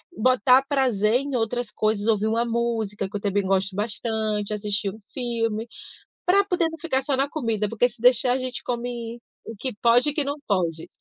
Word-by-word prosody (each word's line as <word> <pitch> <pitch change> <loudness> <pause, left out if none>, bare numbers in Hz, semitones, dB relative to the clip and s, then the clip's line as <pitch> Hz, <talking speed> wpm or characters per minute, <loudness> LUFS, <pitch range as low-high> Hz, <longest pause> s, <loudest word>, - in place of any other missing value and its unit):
botar 255 +2 +4
prazer 235 -6 +2
em 280 -2 -4
outras 240 0 -1
coisas, 215 -1 0
ouvir 215 -1 +2
uma 230 +2 +1
música, 225 -4 -2
que - - -11
eu 200 - -9
também 205 0 +1
gosto 190 0 0
bastante, 215 0 -1
assistir 205 -1 -1
um 215 - -13
filme, 230 -3 -1 0.6
para 395 +3 +4
poder 355 -4 +1
não 325 - -9
ficar 280 -4 0
só 275 0 0
na 275 +2 +1
comida, 230 -9 -1
porque 230 +3 +2
se 245 - -18
deixar 250 +1 +5
a - - 0
gente 255 -1 -4
come 240 -1 -4 0.3
o 225 - -8
que 260 +2 -2
pode 245 +5 +4
e - - -6
o - - -16
que 300 - +3
não 285 +1 -3
pode. 170 -5 -1
230 Hz, 200 wpm, -24 LUFS, 210-255 Hz, 0.6 s, deixar